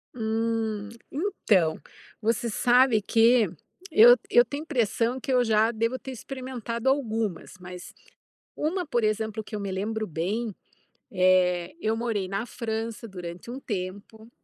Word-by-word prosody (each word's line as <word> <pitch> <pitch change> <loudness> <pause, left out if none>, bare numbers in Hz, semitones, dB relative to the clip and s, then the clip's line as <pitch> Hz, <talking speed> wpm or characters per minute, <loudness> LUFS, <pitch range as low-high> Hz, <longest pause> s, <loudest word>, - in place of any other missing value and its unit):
Hum, 220 -2 -1 0.2
então, 215 - +1 0.4
você 230 +2 0
sabe 245 0 +4
que 225 +1 +4 0.4
eu 240 -3 +9
eu 240 +1 +6
tenho 285 +5 -5
impressão 245 -4 0
que 265 - -4
eu 250 -1 +4
já 220 0 +3
devo 230 +3 -1
ter 265 - -8
experimentado 250 -2 -5
algumas, 225 - -1
mas 180 0 -10 0.6
uma, 345 +3 -1
por 240 -5 0
exemplo, 220 0 -1
que 215 +1 -7
eu - - -4
me 200 -1 -4
lembro 215 +3 -2
bem, 200 +7 -2 0.6
eh, 180 0 +3
eu 220 +1 +1
morei 225 -5 -1
na 200 +3 -2
França 225 -1 -4
durante 180 +1 -8
um 260 - -6
tempo, 205 +1 -6
225 Hz, 135 wpm, -26 LUFS, 205-240 Hz, 0.6 s, eu